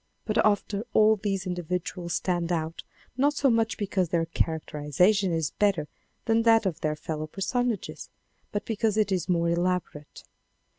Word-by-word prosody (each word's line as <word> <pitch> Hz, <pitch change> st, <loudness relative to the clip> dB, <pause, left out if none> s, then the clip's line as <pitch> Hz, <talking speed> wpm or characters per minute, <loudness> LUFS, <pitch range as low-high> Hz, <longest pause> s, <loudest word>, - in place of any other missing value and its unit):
But 215 Hz, 0 st, +2 dB
after 205 Hz, 0 st, +1 dB
all 215 Hz, 0 st, +6 dB
these 195 Hz, -2 st, -2 dB
individuals 180 Hz, 0 st, -3 dB
stand 175 Hz, -2 st, -1 dB
out 165 Hz, -1 st, -2 dB, 0.4 s
not 290 Hz, +3 st, +2 dB
so 275 Hz, -3 st, +3 dB
much 225 Hz, -1 st, +1 dB
because 190 Hz, -4 st, -1 dB
their 165 Hz, -1 st, +1 dB
char 160 Hz, -1 st, -1 dB
acterization 180 Hz, +7 st, +1 dB
is 160 Hz, -3 st, -1 dB
better 195 Hz, -8 st, +1 dB, 0.4 s
than 225 Hz, -1 st, +3 dB
that 225 Hz, -1 st, +4 dB
of 170 Hz, -4 st, -2 dB
their 155 Hz, -1 st, 0 dB
fellow 155 Hz, 0 st, -5 dB
personages, 230 Hz, +6 st, -2 dB, 0.4 s
but 205 Hz, 0 st, -3 dB
because 220 Hz, -1 st, 0 dB
it 210 Hz, -2 st, +2 dB
is 185 Hz, -1 st, -1 dB
more 170 Hz, -1 st, +2 dB
elaborate. 170 Hz, -4 st, -2 dB
185 Hz, 155 wpm, -27 LUFS, 165-215 Hz, 0.4 s, all